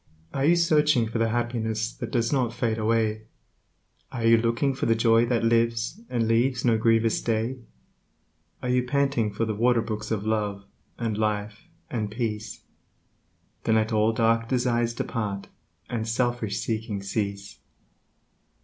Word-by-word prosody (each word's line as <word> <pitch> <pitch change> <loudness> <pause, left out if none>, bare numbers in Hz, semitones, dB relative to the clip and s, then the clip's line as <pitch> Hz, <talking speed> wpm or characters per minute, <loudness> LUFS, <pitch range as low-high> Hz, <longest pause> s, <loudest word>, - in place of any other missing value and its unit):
Are 135 0 0
you 170 +3 +5
searching 150 -7 +3
for 115 +1 -3
the 115 0 +2
happiness 115 -1 -1
that - - -6
does 115 +1 0
not 125 -4 0
fade 115 -2 -1
away? 110 0 0 0.8
Are 115 -3 -3
you 115 0 +7
looking 115 +4 +1
for 130 - -2
the 115 - +4
joy 115 +1 +4
that 120 -1 +1
lives, 115 - +1
and 115 -2 0
leaves 120 +2 +1
no 115 -2 +4
grievous 115 0 +2
day? 115 +3 -1 1.0
Are 125 - -2
you 125 0 +3
panting 130 -4 0
for 110 +3 -1
the 110 - -2
waterbrooks 110 -1 0
of 105 -2 -2
Love, 105 -2 -1 0.3
and 110 -3 -2
Life, 105 +5 -2 0.2
and 110 -4 -2
Peace? 105 -2 -4 1.0
Then 110 - +3
let 110 +1 +1
all 110 +1 +3
dark 115 0 +1
desires 120 -2 +1
depart, 100 -4 -3 0.4
and 115 -2 -3
selfish 115 -3 -1
seeking 110 -3 -3
cease. 100 -1 -4
115 Hz, 150 wpm, -26 LUFS, 110-120 Hz, 1.0 s, you